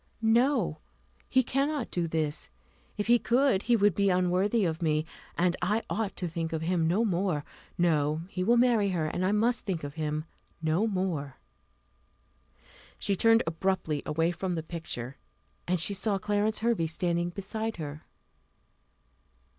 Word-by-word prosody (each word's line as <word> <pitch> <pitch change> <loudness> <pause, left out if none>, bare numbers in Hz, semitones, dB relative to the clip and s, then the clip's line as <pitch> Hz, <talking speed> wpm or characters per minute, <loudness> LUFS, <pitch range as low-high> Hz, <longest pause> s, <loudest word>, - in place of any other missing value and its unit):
"No, 230 - +3 0.5
he 260 - +4
cannot 275 +1 -1
do 175 -2 -1
this: 155 - -2 0.5
if 205 - -1
he 240 +1 +5
could 245 -5 +2
he 240 +2 +3
would 205 -3 +4
be 200 +3 +2
unworthy 185 +4 +2
of 160 -1 -2
me, 155 -1 +1 0.3
and 175 0 +2
I 210 +5 +1
ought 220 -2 -1
to 180 - -3
think 165 0 -3
of 160 0 -2
him 170 -1 +1
no 200 +8 +2
more. 180 -6 0 0.3
No; 155 -3 +2
he 185 -1 -3
will 235 +5 +4
marry 235 -4 +4
her; 170 -4 0
and 175 +4 -2
I 185 - +2
must 230 +4 +2
think 180 -7 -3
of 145 0 -5
him 155 -1 -2 0.3
no 165 +6 +1
more." 180 -9 -2 1.6
She 200 - 0
turned 225 +3 +5
abruptly 165 -3 -1
away 160 +3 +1
from 180 0 -3
the 160 - -3
picture, 150 -6 -6 0.5
and 180 0 +1
she 190 +5 +1
saw 200 +1 0
Clarence 210 +2 0
Hervey 225 -8 +1
standing 170 +1 -1
beside 220 +4 -4
her. 150 -2 -6
180 Hz, 155 wpm, -29 LUFS, 160-215 Hz, 1.6 s, he